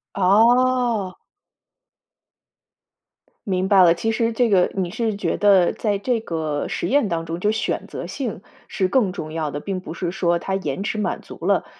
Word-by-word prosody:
哦。 230 0 +3 2.3
明 185 -1 0
白 195 -2 +6
了， 170 -2 +6
其 225 +6 -1
实 230 +1 0
这 240 +1 +2
个 185 -3 +3
你 185 -3 -2
是 220 +1 -2
觉 205 - -1
得 195 -4 +4
在 210 -2 -1
这 235 +3 -1
个 160 -7 -3
实 - - -3
验 280 -5 +2
当 165 -2 -2
中 165 +1 -5
就 210 - +2
选 220 +1 -2
择 - - -7
性 235 -8 -5 0.2
是 195 -3 -1
更 210 -1 +2
重 155 -5 -6
要 160 -2 -2
的， 145 - -5
并 190 +3 -4
不 175 - -8
是 175 0 -3
说 175 -1 0
他 190 - -3
延 190 -3 -3
迟 215 +1 -3
满 210 - -2
足 - - -12
了 - - +2
195 Hz, 195 characters per minute, -22 LUFS, 175-225 Hz, 2.3 s, 白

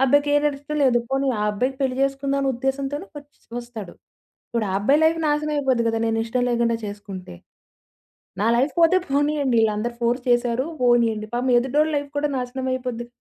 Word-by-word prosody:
అబ్బాయికేనాడిస్టంలేదు 290 -1 +2
పోనీ 270 0 0
ఆ - - 0
అబ్బాయికి 255 +6 -1
పెళ్లి 260 -1 0
చేసుకుందాం 275 0 0
అనే 275 - 0
ఉద్దేశంతోనే 270 +6 -2
వచ్చి 290 0 -18 0.2
వస్తాడు. 230 -6 -8 0.6
ఇప్పుడు 230 -3 -1
ఆ - - -2
అబ్బాయి 280 +9 +3
లైఫ్ 325 +1 +3
నాశనమయిపోద్ది 295 -5 +1
కదా! 225 0 0
నేనిష్టం 225 +2 0
లేకుండా 235 -1 +1
చేసుకుంటే? 200 - -8 1.1
నా - - +2
లైఫ్ 270 +5 +1
పోతే 335 +3 +5
పోనీయండి. 285 -2 +1
వీళ్ళందరూ 220 +2 0
ఫోర్స్ 240 +2 +1
చేశారు 240 +1 +2 0.2
పోనీయండి. 230 -3 +3
పాపం 250 +1 0
ఎదుటోళ్ళ 295 +5 +1
లైఫ్ 285 0 -3
కూడా 295 +1 +1
నాశనం 255 +1 -4
అయిపోద్ది. 245 -2 -4
260 Hz, 150 wpm, -23 LUFS, 235-285 Hz, 1.1 s, పోతే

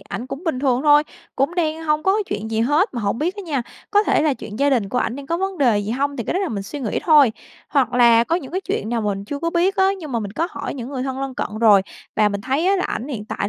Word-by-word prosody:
ảnh 235 +5 -6
cũng 280 +6 -7
bình 320 -7 -1
thường 260 -2 +1
thôi, 295 0 +6 0.3
cũng 275 +6 +1
đang 325 -2 -1
hông 305 -1 +1
có 385 +3 +3
chuyện 220 +2 -4
gì 220 0 0
hết. 295 - +2
Mà 240 - -2
hổng 205 +2 -1
biết 355 +6 -1
á 405 - -6
nha, 290 -8 -2 0.3
có 415 0 +4
thể - - +2
là 300 -3 +2
chuyện 210 -2 -9
gia 285 0 +3
đình 230 -7 +1
của 245 - -1
ảnh 235 - -1
đang 280 -1 -8
có 335 +4 -1
vấn 385 -1 -3
đề 240 -7 +3
gì 205 +1 -3
hông, 280 +3 -1
thì 235 - -3
cái - - -2
đó - - +1
là 380 - -1
mình 200 -3 -3
suy 280 +8 -7
nghĩ 225 - -1
thôi. 295 -8 +6 0.4
Hoặc 275 -3 +1
là 235 -1 +5
có 330 +6 +1
những 280 -3 -7
cái 375 - -1
chuyện 215 - -3
nào 235 0 -1
mình 200 -1 -2
chưa 280 +7 -5
có 335 +3 -1
biết 365 +4 +1
á, 380 -1 +4
nhưng 305 -6 -8
mà 235 - +1
mình 200 -2 -5
có 335 - -1
hỏi - - -5
những 245 -2 -6
người 265 -2 -4
thân 265 0 -4
lân 270 -1 -4
cận 215 -3 -4
rồi, 210 -4 +6 0.3
và 210 -1 +4
mình 200 -1 -3
thấy 270 - 0
á 395 +1 +4
là 370 - -1
ảnh 250 +6 -3
hiện 220 -7 -5
tại 200 - -3
270 Hz, 310 wpm, -21 LUFS, 230-320 Hz, 0.4 s, thôi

